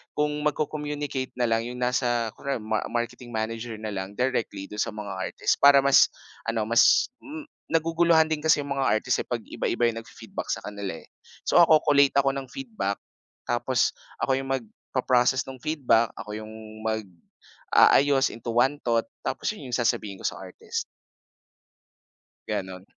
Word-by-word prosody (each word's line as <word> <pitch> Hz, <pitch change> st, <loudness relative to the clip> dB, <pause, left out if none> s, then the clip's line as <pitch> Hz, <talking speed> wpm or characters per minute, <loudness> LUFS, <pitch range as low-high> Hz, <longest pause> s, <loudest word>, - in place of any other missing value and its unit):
kung 150 Hz, 0 st, +1 dB
magko-communicate 150 Hz, -3 st, -2 dB
na 120 Hz, -, +2 dB
lang 115 Hz, 0 st, +1 dB
'yong 125 Hz, +1 st, -6 dB
nasa 120 Hz, -2 st, +1 dB
kunwari 140 Hz, -3 st, -3 dB
ma 110 Hz, 0 st, -1 dB
marketing 120 Hz, +1 st, -4 dB
manager 115 Hz, +1 st, -3 dB
na 110 Hz, -1 st, -5 dB
lang 95 Hz, 0 st, -5 dB
directly 125 Hz, -6 st, -1 dB
do'n 105 Hz, +1 st, -4 dB
sa -, -, -1 dB
mga 105 Hz, -2 st, -6 dB, 0.2 s
artist -, -, 0 dB
para 140 Hz, 0 st, +9 dB
mas 140 Hz, 0 st, +6 dB, 0.4 s
ano, 115 Hz, -1 st, 0 dB
mas, 115 Hz, +2 st, +5 dB, 0.2 s
hmm, 300 Hz, 0 st, -8 dB, 0.3 s
naguguluhan 165 Hz, 0 st, +3 dB
din 160 Hz, -1 st, 0 dB
kasi 160 Hz, -2 st, +4 dB
'yong 140 Hz, 0 st, -3 dB
mga 135 Hz, -, +1 dB
artist, 125 Hz, -, 0 dB
eh, -, -, -36 dB
pag 120 Hz, -, -1 dB
iba-iba 120 Hz, 0 st, -1 dB
'yung 115 Hz, 0 st, -4 dB
nag-fi-feedback 115 Hz, -, -8 dB
sa -, -, -2 dB
kanila, 100 Hz, -5 st, -5 dB
eh. -, -, -18 dB, 0.4 s
So -, -, +4 dB
ako 160 Hz, -2 st, +6 dB
collate 140 Hz, -2 st, +4 dB
ako 135 Hz, 0 st, +2 dB
ng 135 Hz, -1 st, -5 dB
feedback, 220 Hz, -, -3 dB, 0.5 s
tapos 120 Hz, 0 st, +1 dB, 0.3 s
ako 135 Hz, -, +2 dB
'yong 135 Hz, -, -6 dB
magpa-process 130 Hz, +1 st, 0 dB
no'ng 130 Hz, -1 st, -9 dB
feedback. 130 Hz, -7 st, +2 dB
Ako 105 Hz, 0 st, -6 dB
'yong 110 Hz, 0 st, -8 dB, 0.3 s
mag-aayos 110 Hz, +6 st, +2 dB
into 115 Hz, +1 st, -7 dB
one 135 Hz, +5 st, +2 dB
thought 115 Hz, -1 st, +1 dB, 0.2 s
tapos -, -, -1 dB
'yon 130 Hz, -, -9 dB
'yong 120 Hz, -, 0 dB
sasabihin 105 Hz, -4 st, 0 dB
ko -, -, -7 dB
sa -, -, -4 dB
artist. 455 Hz, 0 st, -5 dB, 1.7 s
Gano'n. 95 Hz, -2 st, -4 dB
125 Hz, 160 wpm, -26 LUFS, 110-140 Hz, 1.7 s, para